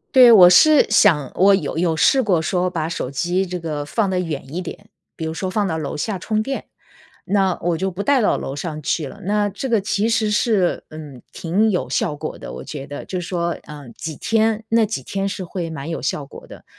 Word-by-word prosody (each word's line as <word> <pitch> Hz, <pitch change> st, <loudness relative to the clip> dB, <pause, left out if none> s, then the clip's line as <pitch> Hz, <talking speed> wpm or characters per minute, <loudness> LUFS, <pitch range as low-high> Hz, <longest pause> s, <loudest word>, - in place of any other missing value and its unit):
对， 250 Hz, -2 st, +9 dB
我 185 Hz, -5 st, +9 dB
是 295 Hz, +12 st, +6 dB
想 160 Hz, -11 st, +4 dB
我 195 Hz, +2 st, +5 dB
有 195 Hz, -, -3 dB
有 165 Hz, -1 st, 0 dB
试 265 Hz, -, +4 dB
过 195 Hz, -8 st, +2 dB
说 180 Hz, +3 st, 0 dB
把 160 Hz, -3 st, -3 dB
手 165 Hz, -, -4 dB
机 175 Hz, +8 st, -1 dB
这 180 Hz, 0 st, -4 dB
个 155 Hz, -3 st, -4 dB
放 200 Hz, +8 st, -1 dB
得 185 Hz, -, 0 dB
远 150 Hz, -5 st, -5 dB
一 180 Hz, -, -2 dB
点。 180 Hz, -, -9 dB, 0.3 s
比 160 Hz, -, -5 dB
如 160 Hz, -, -3 dB
说 185 Hz, +3 st, -3 dB
放 205 Hz, +1 st, 0 dB
到 165 Hz, -, -2 dB
楼 150 Hz, -2 st, -4 dB
下 190 Hz, +5 st, -3 dB
充 215 Hz, +3 st, -1 dB
电， 270 Hz, +2 st, -4 dB, 0.6 s
那 195 Hz, -3 st, +1 dB
我 170 Hz, -1 st, 0 dB
就 190 Hz, +3 st, -2 dB
不 190 Hz, +2 st, -5 dB
带 275 Hz, +1 st, +3 dB
到 -, -, +2 dB
楼 135 Hz, -, -5 dB
上 155 Hz, -1 st, -5 dB
去 150 Hz, +1 st, -1 dB
了。 -, -, -11 dB
那 205 Hz, +1 st, +1 dB
这 230 Hz, +7 st, -5 dB
个 225 Hz, -3 st, +2 dB
其 205 Hz, +2 st, 0 dB
实 220 Hz, -2 st, +1 dB
是， 210 Hz, -4 st, +1 dB
嗯， 150 Hz, -5 st, -10 dB
挺 195 Hz, +7 st, +1 dB
有 180 Hz, -, -2 dB
效 150 Hz, -, -1 dB
果 -, -, -6 dB
的， -, -, -9 dB
我 65 Hz, +1 st, -8 dB
觉 140 Hz, -2 st, -7 dB
得。 145 Hz, 0 st, -7 dB
就 185 Hz, -, -4 dB
是 175 Hz, -, -6 dB
说， 170 Hz, -2 st, -1 dB, 0.2 s
呃， 150 Hz, -2 st, -10 dB
几 160 Hz, -2 st, -6 dB
天 225 Hz, +2 st, 0 dB
那 225 Hz, -1 st, +4 dB
几 200 Hz, -11 st, -4 dB
天 195 Hz, +8 st, -3 dB
是 195 Hz, -1 st, -5 dB
会 170 Hz, -1 st, -5 dB
蛮 160 Hz, 0 st, -6 dB
有 165 Hz, -, -3 dB
效 145 Hz, -, -2 dB
果 135 Hz, -, -13 dB
的。 -, -, -13 dB
180 Hz, 250 characters per minute, -20 LUFS, 160-210 Hz, 0.6 s, 对